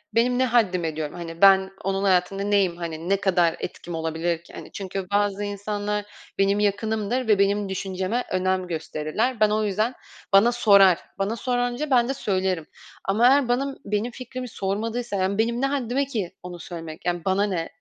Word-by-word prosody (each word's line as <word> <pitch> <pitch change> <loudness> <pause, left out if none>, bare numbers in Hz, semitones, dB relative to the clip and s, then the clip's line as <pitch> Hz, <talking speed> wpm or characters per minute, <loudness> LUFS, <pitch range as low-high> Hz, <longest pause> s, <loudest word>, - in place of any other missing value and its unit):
benim 245 +2 +3
ne 260 - +4
haddime 185 -10 +1
diyorum. 155 0 -4
Hani 165 -1 -8
ben 190 -1 +6
onun 195 +1 -1
hayatında 195 +1 +2
neyim. 200 -4 +2
Hani 165 0 -5
ne 200 - +3
kadar 175 -4 +2
etkim 175 -1 -6
olabilir 165 +1 -2
ki, - - -17
hani, - - -10
çünkü 195 -1 -5
bazı 205 0 +1
insanlar 205 0 -3 0.3
benim 195 +1 +2
yakınımdır 215 +4 0
ve 210 -2 +4
benim 200 0 +2
düşünceme 190 +4 -2
önem 185 0 0
gösterirler. 165 +8 -2
Ben 215 -1 +5
o 215 +1 +1
yüzden, 215 +4 0 0.4
bana 205 +5 +6
sorar. 200 -6 +5 0.2
Bana 200 +3 0
sorunca 245 +3 -1
ben 245 -1 +4
de - - +1
söylerim 185 - -1 0.4
ama 215 +5 +4
eğer 275 0 +4
benim 270 +3 0
benim 210 +4 -1
fikrimi 255 0 -7
sormadıysa 220 +3 -3
yani 190 +1 0
benim 235 +2 +1
ne - - +2
haddime 275 -1 0
ki 215 -10 -4
onu 180 -1 -8
söylemek. 165 -2 -8
Yani 175 -1 -1
bana 195 +1 +2
ne 180 -5 -2
200 Hz, 175 wpm, -24 LUFS, 185-230 Hz, 0.4 s, ben